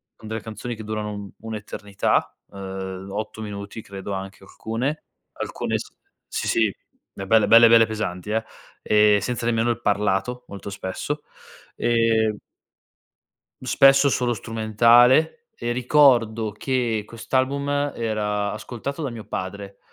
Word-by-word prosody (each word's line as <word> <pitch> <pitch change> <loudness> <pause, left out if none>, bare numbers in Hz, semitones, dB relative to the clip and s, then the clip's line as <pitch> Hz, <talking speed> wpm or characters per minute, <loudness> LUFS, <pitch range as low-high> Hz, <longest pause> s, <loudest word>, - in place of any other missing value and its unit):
con 110 - -13
delle 110 0 -4
canzoni 115 +2 -6
che 110 - -9
durano 105 -1 -3
un 100 -1 -7
un'eternità, 105 -2 -2 0.2
ehm, 95 -1 -6
8 110 +2 -5
minuti 105 +1 -7
credo 100 0 -7
anche, 95 0 -7
alcune, 120 +9 -4 0.3
alcune - - -3
s - - -8 0.4
sì - - -3
sì, 110 -1 +3 0.5
eh 95 0 -7
belle, 110 0 +4
belle, 115 +1 +8
belle 115 0 +7
pesanti, 105 -3 -4
eh, 110 +1 0 0.4
e 105 -1 +4
senza 120 -1 -3
nemmeno 115 0 +1
il 120 0 -1
parlato, 105 +4 0
molto 100 0 -8
spesso. 100 +10 -4 0.5
Ehm 115 -2 +2 1.2
Spesso 135 +2 +5
solo 125 -2 +1
strumentale 120 - +3
e 120 0 -3
ricordo 120 -4 +3
che 115 -1 -1
quest'album 140 +5 -1
era 105 -2 -1
ascoltato 125 +8 -6
da 140 - -2
mio 115 -2 -8
padre, 100 0 -6
110 Hz, 130 wpm, -23 LUFS, 105-120 Hz, 1.2 s, belle